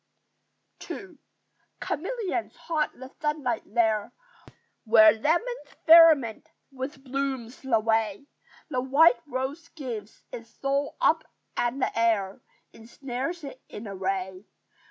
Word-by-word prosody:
II 375 -6 -8 0.7
Chameleons 375 +1 -3
haunt 310 -2 -2
the 260 +1 -11
sunlight 300 -6 -1
there, 220 -3 +1 0.7
Where 220 -1 +7
lemons 345 - -1
firmament 320 -9 +6 0.2
with 270 +1 -7
blooms 265 -2 -4
the 250 -4 +2
way: 220 +1 0 0.5
The 255 - 0
white 285 +6 +5
rose 275 +5 -4
gives 235 -10 -8
its 230 -1 -9
soul 280 +1 -1
up - - +3 0.3
and 240 +3 -1
the - - -1
air 220 -4 +1 0.3
Ensnares 265 +8 -6
it 270 -2 -9
in 210 - -8
a 200 - -6
ray. 190 0 -3
260 Hz, 115 wpm, -27 LUFS, 225-300 Hz, 0.7 s, Where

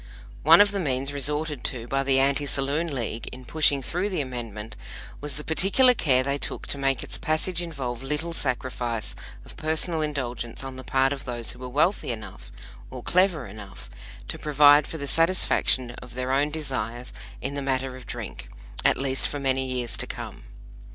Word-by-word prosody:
One 165 +5 +8
of 205 -1 +5
the 200 - -1
means 135 -4 -1
resorted 150 0 -1
to 120 -2 0
by 135 +2 +1
the 135 -1 +3
Anti 140 +1 +2
Saloon 140 +5 0
League 120 -6 -3
in 125 0 -7
pushing 145 -1 +2
through 180 +9 -1
the 185 - -2
Amendment 115 -5 -5 0.4
was 145 0 -3
the 150 - -6
particular 200 - +4
care 130 - +2
they 140 +1 -1
took - - -3
to 140 - -1
make 135 -2 +1
its - - -5
passage 165 +3 0
involve 135 -8 -4
little 150 +5 -2
sacrifice 120 -5 -2 0.3
of - - -12
personal 160 +1 +1
indulgence 125 -6 -3
on 135 -1 -6
the 130 - -8
part 135 +1 +2
of 140 0 -7
those 120 -3 -2
who 125 - -11
were 125 0 -6
wealthy 150 +4 +2
enough, 110 -2 -8 0.4
or 125 -2 -8
clever 180 -6 +2
enough, 100 -1 -10 0.4
to - - -4
provide 145 0 +6
for 160 - -5
the 140 - -4
satisfaction 165 -6 +3
of 125 0 -11
their 130 0 -2
own 140 +2 +3
desires 125 -6 -4 0.3
in 135 - -4
the 140 - -3
matter 135 -1 -1
of 130 -1 -11
drink, - - -6 0.3
at - - +4
least 135 0 +1
for 145 - -3
many 135 -1 +1
years 125 -2 -2
to - - -2
come. - - -7
135 Hz, 185 wpm, -26 LUFS, 125-150 Hz, 0.4 s, One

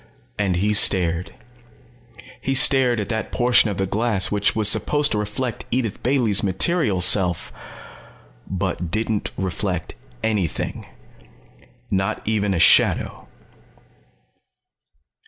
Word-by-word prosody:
And 95 -3 0
he 105 +4 0
stared. 90 -4 +2 1.1
He 135 - -2
stared 130 -3 +4
at 105 -1 -4
that 110 -1 -4
portion 120 -2 +2
of 100 - -5
the 95 - -1
glass 105 0 0
which 105 -1 0
was 110 -2 +2
supposed 145 +7 +2
to 105 - -1
reflect 105 +4 -4
Edith 115 -5 -3
Bailey's 120 -6 +1
material 105 - 0
self 90 -2 +2 1.0
_but 90 -2 -3
didn't 110 +2 -2
reflect 95 -1 -4 0.3
anything. 105 -7 -3 1.0
Not 95 0 -1
even 105 -3 -1
a - - -1
shadow. - - +3
105 Hz, 110 wpm, -21 LUFS, 95-115 Hz, 1.1 s, stared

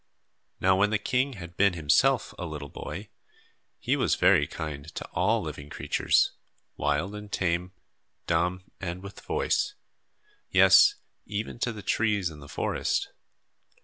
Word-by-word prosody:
Now 95 0 +4
when 105 +1 +4
the 110 - +2
king 130 +5 0
had 85 -5 -10
been 100 0 +4
himself 75 -4 +2
a - - -3
little 75 -2 -6
boy, 95 +10 -7 0.7
he - - 0
was - - +2
very - - +4
kind 75 -2 -6
to - - -4
all 105 +5 +1
living 75 -2 -7
creatures, - - +2 0.4
wild 75 +7 0
and 105 -1 -8
tame, 90 0 -1 0.5
dumb 90 +2 0 0.2
and 90 0 -5
with 100 - -9
voice 415 - 0 0.7
yes, 415 - +7 0.3
even 105 +3 -4
to 125 - 0
the 105 -3 -9
trees 105 -6 +1
in 75 - -11
the 75 -1 -12
forest. - - -1
90 Hz, 145 wpm, -27 LUFS, 80-105 Hz, 0.7 s, yes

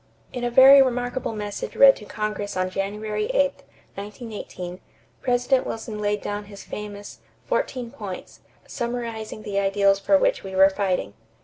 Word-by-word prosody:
In 245 - -4
a 240 - +1
very 270 +3 +9
remarkable 245 -2 -1
message 205 -1 -5
read 275 -1 +8
to 210 - -11
Congress 210 -2 -4
on 185 0 0
January 210 - -2
8, - - +2 0.4
1918, 205 -4 -7 0.4
President 250 +1 +1
Wilson 220 -1 -5
laid 210 0 0
down 205 0 -4
his 200 -1 -11
famous 205 -1 -8 0.3
"fourteen 245 -3 -2
points" 205 -9 -8 0.3
summarizing 230 -3 -5
the 200 -2 -1
ideals 195 0 +3
for 195 0 +4
which - - +1
we 190 -1 -7
were 190 +1 +6
fighting. 185 - -1
210 Hz, 145 wpm, -24 LUFS, 200-245 Hz, 0.4 s, very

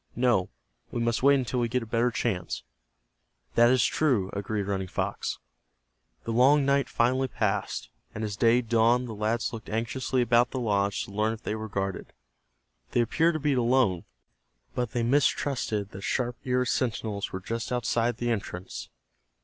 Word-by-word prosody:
"No, 120 -7 +2 0.4
we - - -3
must 115 0 0
wait 140 +2 +6
until 130 -1 -1
we 120 -1 0
get 125 0 0
a - - -7
better 115 +2 +1
chance." 90 - -2 0.9
"That 120 0 +6
is 130 -2 +4
true," 120 -12 +1
agreed 100 +1 -2
Running 95 -1 -2
Fox. - - -3 0.9
The 115 - -3
long 135 +4 +5
night 140 0 +2
finally 130 +3 +2
passed, 105 -4 -2 0.3
and 110 - -3
as 105 -2 -3
day 115 +3 +4
dawned 120 +2 +3
the 115 - -6
lads 110 +3 -1
looked 115 - -7
anxiously 120 +3 0
about 120 +1 +4
the 130 - -4
lodge 100 -4 0
to - - -12
learn 105 +2 0
if 115 - -10
they - - -2
were 110 0 -5
guarded. 95 -2 -3 0.8
They 120 - +4
appeared 160 +8 +2
to - - -1
be 145 -1 +1
alone, 120 -8 +2 0.7
but 125 -3 -2
they 120 - 0
mistrusted 120 -5 +1
that 95 - -8
sharp 120 +3 -1
eared 125 -1 +1
sentinels 110 -4 -1
were 95 - -4
just 115 +6 -4
outside 120 -1 0
the 120 -1 -1
entrance. 95 -4 -5
115 Hz, 170 wpm, -27 LUFS, 105-125 Hz, 0.9 s, wait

